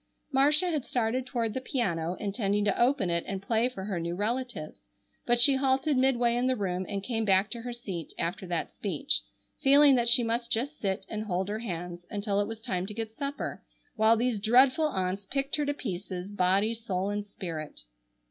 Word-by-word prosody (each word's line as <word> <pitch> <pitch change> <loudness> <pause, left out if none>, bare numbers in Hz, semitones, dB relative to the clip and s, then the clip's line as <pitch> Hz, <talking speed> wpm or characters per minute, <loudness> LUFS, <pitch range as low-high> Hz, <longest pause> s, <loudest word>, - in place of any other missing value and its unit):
Marcia 295 +6 +3
had 300 -5 -1
started 250 +1 -1
toward 230 -4 -1
the 260 - -3
piano 180 -10 -1
intending 205 0 -1
to 205 - +1
open 240 -8 +2
it 170 0 0
and 195 0 -3
play 225 +3 +2
for 195 -7 -7
her 195 -3 -3
new 170 +1 -3
relatives, 220 - -3 0.5
but 240 0 +4
she 275 +3 +9
halted 270 +2 +2
midway 245 -2 +3
in 245 +1 +1
the 260 - +2
room 185 -4 -2
and 200 -2 -3
came 225 0 -1
back 195 0 +3
to 235 - -5
her 245 +1 -5
seat 195 -9 -6
after 180 +2 -3
that 175 -2 -3
speech, 250 +8 0 0.4
feeling 285 0 +7
that 240 -2 +3
she 235 +1 +5
must 235 +1 -1
just 280 +7 -2
sit 190 -1 -2
and 215 0 -4
hold 185 -1 -1
her 215 +1 -2
hands 175 -5 -5
until 205 -1 -1
it 205 - -2
was 225 -1 -6
time 185 -4 -3
to 210 - -5
get 220 -1 -5
supper, 280 +1 -4 0.3
while 220 +1 +4
these 240 -2 0
dreadful 255 +8 +4
aunts 190 -4 -2
picked 275 +4 -1
her 295 -1 -1
to 290 - +1
pieces, 190 -4 -5
body, 200 +3 +2
soul 200 -4 -2
and 205 0 -2
spirit. 160 - -6
220 Hz, 200 wpm, -29 LUFS, 190-255 Hz, 0.5 s, she